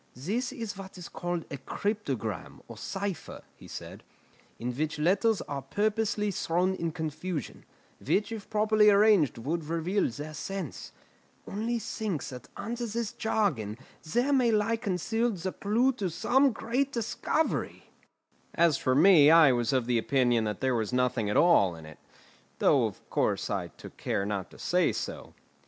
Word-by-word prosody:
"This 210 - -2
is 230 -6 -5
what 190 -1 -9
is 180 - -8
called 175 -1 -4
a 140 - -4
cryptogram, 140 - -4
or - - -9
cipher," 195 -2 -5
he - - -14
said, - - -8 0.6
"in 120 +1 -4
which 155 +3 -2
letters 195 +7 +2
are 140 -1 -5
purposely 210 - 0
thrown 180 +1 0
in 170 -3 -2
confusion, 160 -1 -5 0.4
which 200 - +1
if 220 -3 -7
properly 215 0 +4
arranged 200 - +4
would 155 +7 -3
reveal 170 +5 0
their 150 +6 -7
sense. 180 +1 -6 0.6
Only 225 +4 -2
think 215 -6 -3
that 125 -1 -9
under 235 +1 -4
this 230 0 -3
jargon 145 - -1 0.2
there 240 - 0
may 255 -3 +4
lie 220 +1 +2
concealed 225 +1 -1
the 185 +2 -3
clue 230 +6 +2
to 200 -7 -2
some 265 - +3
great 250 +5 -1
discovery!" 250 +6 -2 0.6
As 170 -4 +3
for 130 - +1
me, 155 -1 +7
I 160 -4 +8
was 120 0 +1
of 130 -3 +1
opinion 120 -1 +2
that 105 -2 -3
there 130 -1 +2
was 110 -2 -1
nothing 125 -4 +1
at 105 - +1
all, 100 - +5
in 80 -1 -11
it; 80 0 -13 0.6
though, - - +4
of - - -11
course, - - 0
I - - -1
took - - -13
care 100 - -1
not 100 -2 -3
to - - -15
say - - +1
so. - - -6
180 Hz, 160 wpm, -29 LUFS, 135-215 Hz, 0.6 s, I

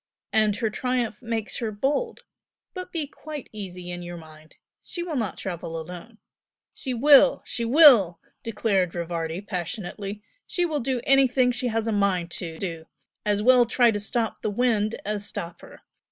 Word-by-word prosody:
and 215 -2 +3
her 220 +1 -1
triumph 245 -2 -2
makes 225 -3 -3
her 225 -3 -2
bold. 285 - -1 0.5
But 365 -1 -7
be 320 -3 -2
quite 295 0 -9
easy 180 -4 -7
in 175 0 -6
your 175 0 -7
mind! 155 -1 -15 0.3
she 345 - -5
will 340 -3 -4
not 220 -9 -2
travel 170 -3 -5
alone!" 180 +7 -9 0.6
"She 265 - -5
will 275 +3 +6
she 235 - -2
will!" 235 - +7 0.2
declared 205 -5 0
Rivardi, 170 0 -3
passionately 200 +1 -5 0.2
"She 355 - 0
will 310 -3 -1
do 255 -1 -1
anything 260 -2 +4
she 245 +1 -1
has 225 -1 -1
a 225 - 0
mind 195 -4 +1
to 165 -1 -5
do! 165 -4 -5 0.4
As 205 0 +1
well 250 0 +6
try 240 0 +4
to 205 - -2
stop 225 +2 -2
the - - -1
wind 215 -1 +1
as 210 0 -2
stop 175 -4 -6
her! - - -14
215 Hz, 170 wpm, -25 LUFS, 180-250 Hz, 0.6 s, will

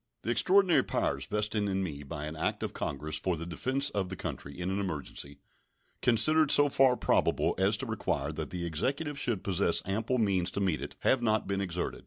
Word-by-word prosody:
The 115 - -1
extraordinary 180 - +4
powers - - -2
vested 105 0 -1
in 95 0 0
me 75 -6 -5
by 75 +1 -6
an 75 +1 -6
act 80 - -2
of - - -3
Congress 75 +2 -3
for 90 +2 -1
the 85 - -6
defense 130 - 0
of 95 -3 -2
the 95 - -4
country 70 -3 -6
in 90 +1 -2
an 95 - -1
emergency, 75 -6 -5 0.6
considered 150 +6 +3
so 145 0 +6
far 130 -2 +4
probable - - +1
as 100 +2 +3
to - - -4
require 70 +2 -2
that 80 0 -5
the 90 -1 -4
Executive 140 - -2
should 115 -8 -1
possess 95 -3 +2
ample 110 +6 -1
means 95 -6 +1
to - - -4
meet 95 -6 0
it, - - -7
have 130 - +3
not 110 -2 +1
been 100 0 -2
exerted. 90 -2 -3
95 Hz, 205 wpm, -30 LUFS, 85-120 Hz, 0.6 s, so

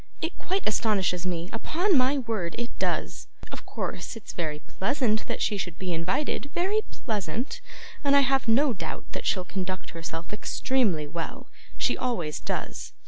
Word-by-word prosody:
It 325 +2 -2
quite 380 +2 0
astonishes 195 -5 +2
me, 170 -1 -1
upon 345 - +2
my 265 +2 +5
word 220 -9 -1
it 240 0 -2
does. - - 0 0.2
Of - - -8
course - - -3
it's 225 - -8
very 155 -4 -1
pleasant 215 - +1
that - - -1
she 210 - +2
should 175 -3 -3
be 185 -2 -1
invited, 190 - 0
very 390 +5 +3
pleasant, 220 +3 -2 0.4
and 280 -1 +5
I 280 - +8
have 270 -1 +3
no 255 +4 +5
doubt - - -4
that - - -3
she'll 185 -2 +2
conduct 185 0 -3
herself 165 +2 -5
extremely 210 - +1
well; 170 - -5 0.3
she - - +3
always 180 -12 -1
does. - - -3
215 Hz, 160 wpm, -28 LUFS, 180-270 Hz, 0.4 s, I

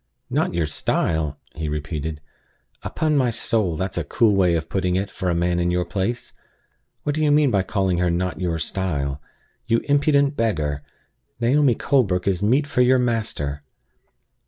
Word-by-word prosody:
"Not - - 0
your 85 -2 +1
style?" 75 0 -1 0.2
he 80 -1 -4
repeated. 75 0 -4 0.6
"Upon 155 -1 -1
my 130 -3 +3
soul, 110 -6 0
that's 95 +2 -2
a - - -2
cool 105 +8 +2
way 90 -3 +3
of 80 0 -2
putting 90 -1 0
it, 95 +1 -1
for 90 - -3
a 85 - +1
man 85 +1 +1
in 85 0 +1
your 90 0 0
place! 100 +6 -3 0.7
What 145 - 0
do 155 +1 -1
you 150 - +3
mean 145 -2 +4
by 100 -3 +3
calling 95 -2 0
her 90 0 +2
'not 90 +2 -2
your 85 -2 0
style?' 75 -5 -2 0.5
You 115 0 +2
impudent 145 0 +3
beggar! 75 - -1 0.6
Naomi 130 +1 +3
Colebrook 100 -12 +1
is 95 -3 +1
meat 130 +8 +3
for 140 -3 0
your 130 +1 +5
master!" 110 - -2
95 Hz, 170 wpm, -22 LUFS, 85-120 Hz, 0.7 s, your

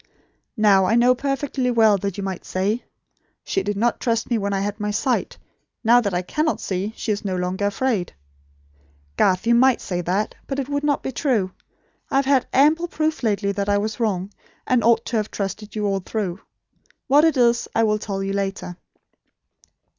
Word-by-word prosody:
"Now 200 -3 +5
I 220 - +2
know 245 +1 +5
perfectly 275 -1 -2
well, 225 -3 +4
that 200 0 -3
you 200 - -4
might 190 -2 -4
say: 205 +6 -1 0.6
'She 390 - -1
did 205 - -3
not 235 +3 +1
trust 230 0 -1
me 235 - +3
when 200 0 -2
I 195 -1 0
had 205 +1 -3
my 210 0 -2
sight. 245 +5 -1 0.5
Now 240 +2 +6
that 200 -4 -1
I 180 0 -1
cannot 305 - -1
see, 190 +2 -3
she 220 - -2
is 205 - -2
no 190 -2 -2
longer 185 +2 -1
afraid.' 205 -3 -1 1.0
Garth, 185 - +2
you 235 - +4
might, 255 +1 +4
say 180 -2 -3
that; 190 +5 -1
but 270 - -3
it 275 -2 -2
would 285 0 -2
not 290 -1 0
be 265 - -3
true. 235 -8 0 0.6
I - - -3
have 275 0 +3
had 270 -2 +2
ample 310 +5 +3
proof 315 -1 -1
lately 205 -3 0
that 200 0 -2
I 205 - +3
was 210 +2 -3
wrong, 200 -4 -1 0.3
and 250 -3 +2
ought 230 0 +3
to 235 - -1
have 215 -1 -1
trusted 205 +2 -5
you 210 -1 -1
all 195 -1 0
through. 190 -1 -4 0.7
What 285 +3 +5
it 320 -4 +3
is, 240 -1 +3
I 225 - +3
will 215 -1 +2
tell 195 -2 -4
you 195 0 -2
later. 195 -3 -3
215 Hz, 200 wpm, -22 LUFS, 195-250 Hz, 1.0 s, Now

